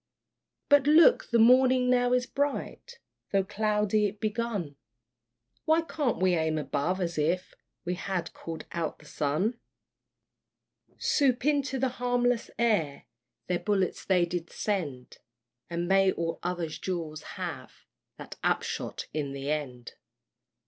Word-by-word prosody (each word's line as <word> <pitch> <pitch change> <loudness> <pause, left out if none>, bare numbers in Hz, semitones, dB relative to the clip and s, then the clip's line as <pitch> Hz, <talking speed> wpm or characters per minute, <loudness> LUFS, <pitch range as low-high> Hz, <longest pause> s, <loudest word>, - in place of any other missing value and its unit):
But 285 -1 +5
look, 335 +11 +6
the 235 - +3
morning 255 +2 +5
now 245 0 +3
is 250 0 +2
bright, 285 - -3 0.3
Though 195 -1 +3
cloudy 210 +1 +1
it 205 +1 -8
begun: 215 -8 -2 0.9
Why 320 +1 +4
can't 300 -5 -1
we 185 -1 +2
aim 160 -2 +1
above, 155 +5 -1
as 170 -3 -2
if 175 +5 0 0.3
We 180 - -1
had 185 -1 -3
called 165 -1 -7
out 165 -2 -3
the 150 - -18
sun? 155 - -1 1.4
Soup 280 - +1
into 285 -2 +1
the 265 0 +1
harmless 245 -1 +1
air 205 -12 +1 0.4
Their 180 -1 -1
bullets 195 -4 0
they 180 -3 +3
did 175 -1 -4
send; 150 -12 -3 0.5
And 170 0 -2
may 195 0 +4
all 165 -2 -3
other 175 -1 -2
duels 160 -1 -4 0.2
have - - -7 0.3
That - - -10
upshot - - -1
in 145 -2 -3
the 140 +1 -3
end! 125 -6 -4
195 Hz, 130 wpm, -28 LUFS, 165-245 Hz, 1.4 s, look